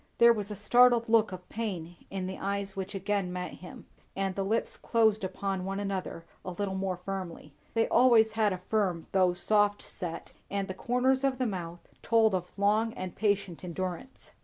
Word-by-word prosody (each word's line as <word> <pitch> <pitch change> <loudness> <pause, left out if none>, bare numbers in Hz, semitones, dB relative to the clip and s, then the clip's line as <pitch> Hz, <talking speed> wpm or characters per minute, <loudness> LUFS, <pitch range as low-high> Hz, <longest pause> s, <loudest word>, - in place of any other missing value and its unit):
There 235 0 +7
was 210 -2 -4
a 210 - -5
startled 240 +3 +5
look 225 -2 +4
of 180 -1 -8
pain 180 -7 -4
in 190 -1 -3
the 190 +1 -5
eyes 200 0 -2
which 195 +1 -5
again 195 -1 -1
met 180 0 -4
him, 180 - -10 0.3
and 195 -1 -1
the 195 - -2
lips 220 +4 -1
closed 220 -3 +2
upon 190 0 -2
one 195 +1 -3
another 195 -4 -4 0.2
a - - -5
little 190 +2 -3
more 190 -1 -2
firmly. 185 -2 -6 0.2
They 225 - +3
always 235 -3 +5
had 215 -1 +2
a 185 - -2
firm 190 -6 0
though 185 -2 +3
soft 205 +2 +2
set, 170 -3 -6 0.2
and 200 -1 -2
the 190 - -4
corners 250 +6 +1
of 270 -1 +1
the 255 - 0
mouth 175 -5 -5
told 225 -2 +3
of 180 -1 -2
long 215 +3 +2
and 185 -1 -6
patient 200 -4 0
endurance. 185 +8 -6
195 Hz, 185 wpm, -29 LUFS, 185-220 Hz, 0.3 s, There